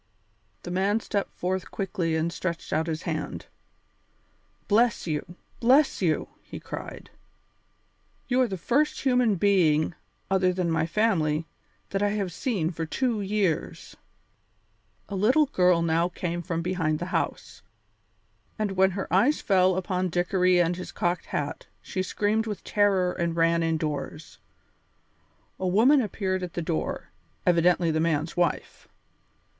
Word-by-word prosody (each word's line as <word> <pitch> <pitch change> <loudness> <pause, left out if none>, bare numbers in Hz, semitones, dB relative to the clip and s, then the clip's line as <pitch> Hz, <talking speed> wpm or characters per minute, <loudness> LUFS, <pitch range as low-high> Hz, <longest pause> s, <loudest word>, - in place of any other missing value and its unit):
The 175 - -6
man 195 +4 +1
stepped 200 -2 -3
forth 185 +1 -2
quickly 180 -4 -2
and 165 +1 -1
stretched 170 -2 -4
out 160 +2 +1
his 160 -1 -3
hand. 155 -3 -4 1.2
"Bless 230 +3 +3
you! 160 +2 -4 0.2
Bless 265 +3 +4
you!" 165 -4 0
he - - -9
cried. - - -8 1.2
"You 255 0 +2
are 255 - +3
the 195 -3 -4
first 280 - +1
human 250 -5 +3
being, 170 -5 +3 0.4
other 185 -1 +3
than 180 -2 -1
my 160 0 +1
family, 165 -6 +1 0.5
that 195 - -1
I 205 - +2
have 200 -4 -2
seen 185 -7 -1
for 165 -1 -4
two 230 +6 -1
years." 195 -5 -2 1.1
A 200 - -5
little 250 +11 +4
girl 180 -9 +3
now 165 +1 +2
came 175 -1 -3
from 165 0 -3
behind 165 -4 0
the 175 - -4
house, - - -3 1.0
and 215 -3 -1
when 190 0 +3
her 195 - -3
eyes 240 +11 +4
fell 185 -2 +3
upon 185 -1 -1
Dickory 180 +1 +2
and 175 0 +1
his 180 - -7
cocked 175 -1 -1
hat 145 0 -4
she 185 - -4
screamed 210 +4 0
with 210 -2 -5
terror 195 -3 +2
and 170 -1 -2
ran 165 0 +3
indoors. 155 -1 -3 1.2
A 185 - -1
woman 240 +10 +5
appeared 190 -4 -2
at 180 -2 -5
the 175 - -3
door, 80 - -3 0.3
evidently 175 -1 +3
the 155 - 0
man's 160 -1 0
wife. 175 -1 -1
180 Hz, 140 wpm, -26 LUFS, 165-205 Hz, 1.2 s, woman